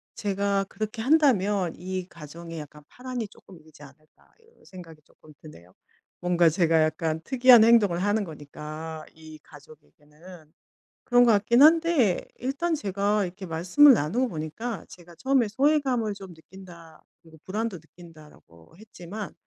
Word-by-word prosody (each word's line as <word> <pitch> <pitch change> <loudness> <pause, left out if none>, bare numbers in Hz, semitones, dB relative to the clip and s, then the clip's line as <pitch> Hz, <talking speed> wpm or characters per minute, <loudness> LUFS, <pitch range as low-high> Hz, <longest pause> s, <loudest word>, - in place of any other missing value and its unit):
'제가 200 -1 -1
그렇게 215 +3 -6
한다면 210 - +2
이 185 0 -5
가정에 165 +1 -10
약간 150 0 -12
파란이 250 -4 -6
쪼끔 185 -4 -17
일지 155 -1 -20
않을까.' 155 +2 -20
이런 460 +1 -27
생각이 165 -5 -13
쪼끔 155 - -21
드네요. 90 - -15 0.5
뭔가 175 -2 +2
제가 165 -1 +2
약간 160 0 -2
특이한 250 -2 +6
행동을 215 -7 +4
하는 205 +1 0
거니까 155 0 -9
이 155 -1 -14
가족에게는 150 +2 -17 0.5
그런 245 0 +4
것 235 - +4
같기는 235 +6 +4
한데 320 - +3 0.2
일단 285 +7 -2
제가 205 -3 -1
이렇게 185 +2 -8
말씀을 180 - +5
나누고 225 - -1
보니까 195 +7 -6
제가 175 -1 -15
처음에 260 +2 +1
"소외감을 260 -3 0
좀 195 -3 -11
느낀다. 170 -1 -15 0.2
그리고 160 -1 -18
불안도 210 0 -4
느낀다."라고 155 - -18
했지만, 210 -1 -9
185 Hz, 335 characters per minute, -25 LUFS, 160-230 Hz, 0.5 s, 특이한